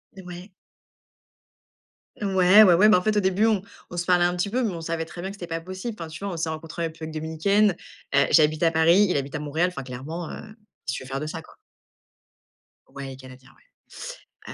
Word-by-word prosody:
Heu, 190 - -11
ouais. 180 +3 -9 1.6
Ouais, 195 0 +5
ouais, 185 -4 +6
ouais, 210 +5 +6
bah, 210 - +6
en 180 - 0
fait, 215 -1 +1
au - - +4
début, 190 +2 +2
on 215 -4 +2 0.3
on 175 - -6
se 175 - -1
parlait 175 -1 +4
un 175 0 +1
petit 180 +3 -1
peu, 250 +4 0
mais 220 - 0
on 165 - -6
savait 165 0 -3
très 175 +1 -9
bien 190 - -4
que 200 - -8
c'était 180 - -7
pas 165 0 -4
possible. 185 +6 -6
Enfin, 165 - -5
tu 170 +5 -9
vois, 200 - -3
on 170 - -5
s'est 160 0 -2
rencontré 160 +2 -6
en - - +1
République 160 -1 -7
Dominicaine, 160 +6 +1 0.4
heu, 140 - +5
j'habite 155 0 +4
à 165 - +4
Paris, 170 +5 +5
il 180 - 0
habite 140 +3 -4
à - - -2
Montréal. 155 +4 0
Enfin 140 - -6
clairement, 140 +7 -6
heu, - - -7
qu'est-ce 210 - -9
tu - - -6
veux - - -11
faire 135 +1 -3
de 150 - -4
ça, 165 +1 -6
quoi? - - -18 1.4
Ouais, 140 0 -7
il - - -7
est 130 - -12
Canadien, 130 0 -14
ouais. - - -12
170 Hz, 240 wpm, -25 LUFS, 155-190 Hz, 1.6 s, ouais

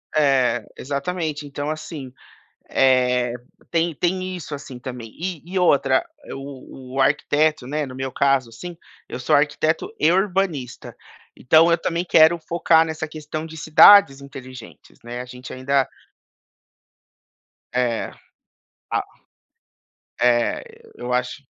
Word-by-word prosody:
É, 130 -6 +2
exatamente. 150 +2 -3
Então 145 +1 -5
assim, 155 -3 -6 0.6
eh, 125 -2 +2 0.4
tem 170 0 0
tem 185 +3 -1
isso, 155 -4 -6
assim, 135 -3 -10
também. 125 -3 -8
E 175 -3 -4
e 185 +2 -2
outra, 180 - +3 0.3
o 135 -1 -10
o 135 - +2
arquiteto, 150 0 +1
né, 150 +2 -2
no 130 -1 -9
meu 130 0 -4
caso, 135 -2 +1
assim, 170 +10 -9 0.3
eu - - -6
sou 125 - +2
arquiteto 150 +5 0
e 155 - +4
urbanista. 180 - -1 0.4
Então 160 +6 +5
eu 170 - +4
também 170 +1 -2
quero 165 0 +5
focar 165 0 +3
nessa 155 -1 -4
questão 155 0 -6
de 160 0 -10
cidades 160 -1 +7
inteligentes, 130 -3 -12
né, 120 +1 -6
a - - -8
gente 125 +1 -10
ainda 135 +1 +1 1.9
É. 125 -2 -1 0.8
A - - 0 1.2
É, 120 -1 +2 0.3
eu 125 0 -4
acho 125 +3 -2
145 Hz, 125 wpm, -22 LUFS, 130-160 Hz, 1.9 s, cidades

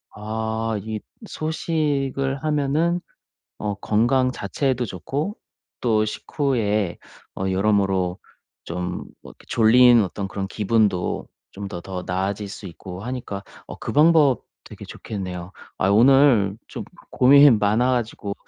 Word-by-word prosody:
아 110 +1 -3
이 110 +1 -5 0.3
소식을 145 -5 -1
하면은 155 +4 +1 0.6
어 105 -1 -2
건강 120 +6 +2
자체에도 130 -2 -1
좋고 140 - -4 0.4
또 110 -3 +2
식후에 110 - -1 0.4
어 95 - -1
여러모로 95 -2 +1 0.5
좀 90 +1 -4 0.2
뭐 - - -12
이렇게 - - -18
졸린 120 +1 +6
어떤 100 +1 -4
그런 95 0 -4
기분도 105 -3 0 0.2
좀 100 0 -6
더 90 -3 -6
더 90 0 -6
나아질 100 +3 -2
수 100 +1 -9
있고 90 +2 -9
하니까 120 -5 -5 0.2
어 - - -7
그 - - -5
방법 150 -3 +4 0.2
되게 - - -11
좋겠네요. 90 -3 -7 0.3
아유 95 +1 +2
오늘 120 -4 +5
좀 - - -7 0.3
고민이 140 +3 +7
많아 110 +4 +2
가지고 115 -4 -2
110 Hz, 245 characters per minute, -23 LUFS, 100-135 Hz, 0.6 s, 고민이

